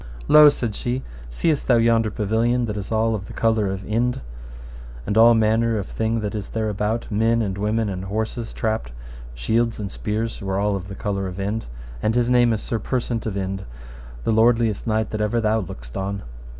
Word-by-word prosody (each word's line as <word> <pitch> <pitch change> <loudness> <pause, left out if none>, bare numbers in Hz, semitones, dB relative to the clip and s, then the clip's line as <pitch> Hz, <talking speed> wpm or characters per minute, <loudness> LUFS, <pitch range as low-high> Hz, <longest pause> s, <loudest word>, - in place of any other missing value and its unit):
Lo, 150 0 +9
said 120 -6 -2
she, 125 +4 -3 0.3
seest 145 - 0
thou 125 - +5
yonder 115 -1 +3
pavilion 115 +4 +1
that 105 -2 -4
is 100 0 -5
all 110 0 +2
of 100 -3 -4
the - - -9
colour 110 -3 +1
of 95 0 -4
Inde, 120 +4 0 0.9
and 100 - -1
all 115 +1 +7
manner 110 +1 +2
of 100 - -2
thing 115 +1 -1
that 105 -1 -2 0.2
there 110 -1 -1
is - - 0
about, 105 +3 -1
men 115 +2 +2
and 95 -3 -2
women, 105 +2 0
and 95 -1 -4
horses 110 +3 -3
trapped, 110 - -2 0.4
shields 115 - 0
and 100 -3 -4
spears 110 +2 -3
were 95 -1 -2
all 100 0 +1
of 95 -1 -5
the 100 - -7
colour 100 -2 -2
of 90 +1 -7
Inde, 105 +3 -2 0.3
and 110 +2 +1
his 120 0 +2
name 120 -1 +5
is 110 -2 -1
Sir 115 - -2
Persant 120 -1 -2
of 100 -2 -3
Inde, 95 0 -3 0.6
the - - +1
most 110 - +1 0.2
lordliest 115 -2 -1
knight 110 0 0
that 110 - -2
ever 105 +3 +1
thou 110 0 +1
lookedst - - -9
on. 100 +1 -3
110 Hz, 205 wpm, -22 LUFS, 100-115 Hz, 0.9 s, Lo